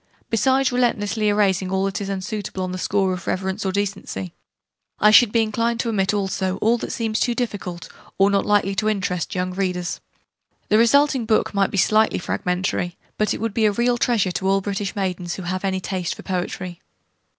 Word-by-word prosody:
Besides 260 +4 +3
relentlessly 220 -3 +1
erasing 195 -3 +1
all 190 0 +1
that 195 +1 -2
is 200 - -4
unsuitable 195 0 -4
on 185 - -3
the 185 - -4
score 190 -1 +1
of 180 -1 -7
reverence 190 +2 -2
or 190 - 0
decency, 190 - -3 0.7
I 210 - +6
should 215 0 +7
be 230 0 +3
inclined 230 +2 -1
to 235 - -2
omit 195 -3 +1
also 190 -2 -1
all 230 +4 +2
that - - -5
seems 225 -1 -1
too 240 - +1
difficult, 200 -8 -4 0.3
or 195 +1 +4
not 200 0 +2
likely 205 -1 +2
to 215 +2 0
interest 185 -5 -2
young 180 0 -1
readers. 180 -2 -2 0.7
The 215 - +5
resulting 265 0 +3
book 220 -1 +2
might 200 -1 +2
be - - -4
slightly 215 +3 +3
fragmentary: 180 0 -2 0.2
but 215 - +1
it - - -7
would 225 -1 -2
be 220 0 +2
a 210 - +4
real 240 +3 +1
treasure 220 -8 +2
to 185 +2 -2
all 195 0 +3
British 200 +1 -3
maidens 180 -3 -2
who 190 - -7
have 185 +2 -3
any 190 -1 0
taste 185 -2 -3
for - - -11
poetry. 180 -1 -4
200 Hz, 195 wpm, -22 LUFS, 185-220 Hz, 0.7 s, should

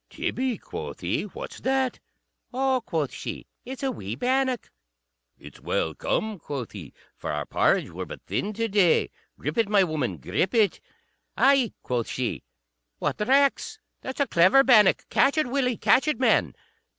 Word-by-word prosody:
"Tibby," 255 -3 -2
quoth - - -8
he, - - -1
"what's - - -8
that?" 265 -1 0 0.5
"Oh," 260 0 +1
quoth 160 - -2
she, - - -6 0.2
"it's 265 +3 -7
a 270 - +1
wee 105 - -6
bannock." 255 - 0 0.7
"It's - - -13
well 80 - -1
come," 215 - -2
quoth 140 -6 -6
he, 90 -9 -9 0.2
"for - - -5
our 75 -1 -3
porrage - - +1
were - - -6
but - - -9
thin 210 - -2
to 230 +2 -1
day. 195 -5 +3 0.3
Grip - - -3
it, 225 -3 +2
my 205 -2 +5
woman; 150 - -2
grip 100 - -1
it." 215 -3 +3 0.6
"Ay," 270 -5 +4
quoth 120 -2 -2
she; 125 -2 -3 0.6
"what - - -2
recks! 275 - +2 0.2
That's 260 - -6
a 280 - +3
clever 190 +7 +5
bannock. 215 -7 +5
Catch 280 +3 +3
it, 310 - +3
Willie; 250 -2 0
catch 265 - +3
it, 300 - 0
man." 260 - +2
230 Hz, 165 wpm, -25 LUFS, 160-265 Hz, 0.7 s, my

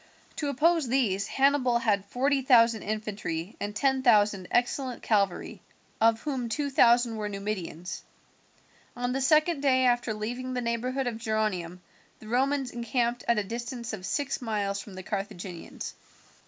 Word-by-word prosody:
To 295 - -2
oppose 310 +2 +2
these 220 -6 +1
Hannibal 270 -3 +3
had 210 -4 +1
forty 270 +5 +1
thousand 230 -4 +5
infantry 205 -3 -4
and 205 0 -4
ten 265 +3 +2
thousand 210 -6 +3
excellent 245 +1 0
cavalry, 200 -5 0 0.4
of 225 0 +4
whom 260 -5 -3
two 280 +5 -2
thousand 240 -2 +4
were 210 -1 -3
Numidians. 195 -4 -5 0.9
On 245 0 -2
the 270 - -1
second 305 +3 +3
day 260 -2 +3
after 240 -3 +1
leaving 245 +4 -4
the - - 0
neighbourhood 245 +3 -1
of 235 -2 -3
Geronium 210 -6 -2 0.4
the 215 - -13
Romans 265 +2 +1
encamped 240 0 -1
at 235 - +3
a 210 - +1
distance 235 +2 -5
of 195 -4 -6
six 285 -1 -2
miles 205 -4 -2
from 200 - -11
the 185 - -7
Carthaginians. 190 -3 -6
235 Hz, 150 wpm, -28 LUFS, 210-255 Hz, 0.9 s, thousand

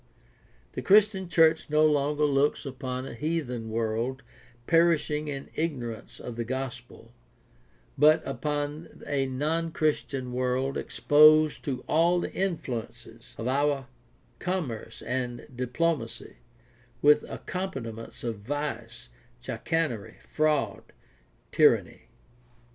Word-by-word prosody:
The - - -5
Christian 200 -2 +4
church 165 -2 +4
no 155 +1 +4
longer 150 0 +2
looks 145 +1 +1
upon 130 -1 -4
a - - -7
heathen 125 -5 -3
world 115 +4 -2 0.4
perishing 165 -2 +2
in 140 -2 -6
ignorance 125 -9 -4
of 120 -2 -7
the 120 - -1
gospel, 120 -2 -6 0.9
but 155 +2 +5
upon 145 +3 -4
a 135 -2 0
non 155 +5 -1
Christian 140 -5 -1
world 130 +2 0
exposed 155 +1 +5
to 135 -3 -3
all 170 +3 +3
the - - -4
influences 155 - -4
of 115 - -4
our 140 0 +1 0.5
commerce 170 - -4
and 125 -1 -3
diplomacy, 125 - -2 0.7
with 150 +1 +6
accompaniments 125 - -6
of 115 -4 -3
vice, 120 - -5 0.3
chicanery, 155 -11 -2
fraud, 150 -9 0 0.7
tyranny. - - +3
140 Hz, 105 wpm, -28 LUFS, 125-155 Hz, 0.9 s, with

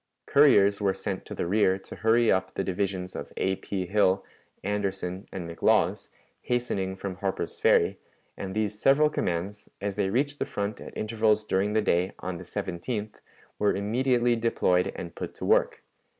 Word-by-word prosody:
Couriers 105 -9 +5
were 95 -2 +2
sent 95 -1 -4
to - - -6
the - - -2
rear 95 0 +3
to 95 - -11
hurry 115 +1 +3
up 95 0 0
the 95 - -1
divisions 95 -1 -2
of - - -6
A. 95 0 0
P. 95 -1 -3
Hill, 95 0 +2 0.4
Anderson, 95 -2 -2
and 90 -3 -5
McLaws, 85 0 +1 0.3
hastening 100 -6 -1
from 95 -1 -5
Harper's 95 -1 -3
Ferry, - - +3 0.4
and 95 0 -6
these 105 -1 -1
several 150 +4 +4
commands, 95 - -3
as 100 0 -3
they 100 -2 +1
reached 140 +7 0
the - - 0
front 100 +1 -4
at - - -9
intervals 110 -1 +1
during 100 0 0
the 110 -1 +2
day, 90 -1 +1
on 90 -1 -5
the - - -8
17th, 105 +4 -4 0.4
were 105 - +2
immediately 120 +4 +2
deployed 100 -6 +1
and 85 - -7
put - - -6
to - - -6
work. - - +2
100 Hz, 170 wpm, -27 LUFS, 95-110 Hz, 0.4 s, Couriers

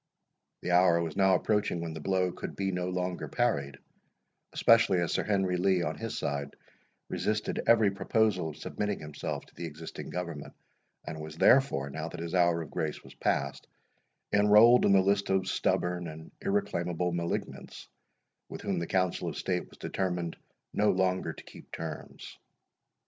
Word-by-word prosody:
The 90 - -1
hour 90 -1 +5
was 80 -2 -3
now 95 -1 +4
approaching 105 -2 0
when 85 -1 -4
the 80 - -6
blow 95 +2 +1
could - - -7
be 95 -1 -1
no 90 0 -2
longer 90 0 -3
parried, 70 - 0 0.7
especially 115 -5 +4
as 85 -1 0
Sir - - 0
Henry 95 -3 +1
Lee, 90 -1 +2
on 80 -1 -2
his - - -5
side, 70 0 -3 0.5
resisted 105 0 -1
every 110 -4 +5
proposal 100 -3 +1
of 75 - -10
submitting 105 -1 -3
himself 75 -1 -5
to - - -23
the 85 - -5
existing 80 +1 -8
government, 85 -5 -5 0.5
and 80 0 -6
was 80 0 -8
therefore, 75 - +4
now 80 +2 -4
that 90 - -8
his 85 0 -5
hour 85 -2 +3
of 75 - -12
grace 80 -2 -3
was - - -13
passed, - - -1 0.7
enrolled 105 +4 +7
in - - +4
the 95 -1 +6
list 100 +1 +1
of 95 -1 +1
stubborn 90 -1 0
and 80 0 -10
irreclaimable 90 - -1
malignants, 85 0 -4 0.6
with - - -7
whom 100 -4 -1
the 85 - -3
Council 90 -2 0
of - - -7
State 90 -1 -2
was - - -17
determined 90 -3 -2 0.4
no 105 +1 +3
longer 95 0 +1
to - - -12
keep - - -14
terms. 80 -1 -7
90 Hz, 165 wpm, -30 LUFS, 80-100 Hz, 0.7 s, enrolled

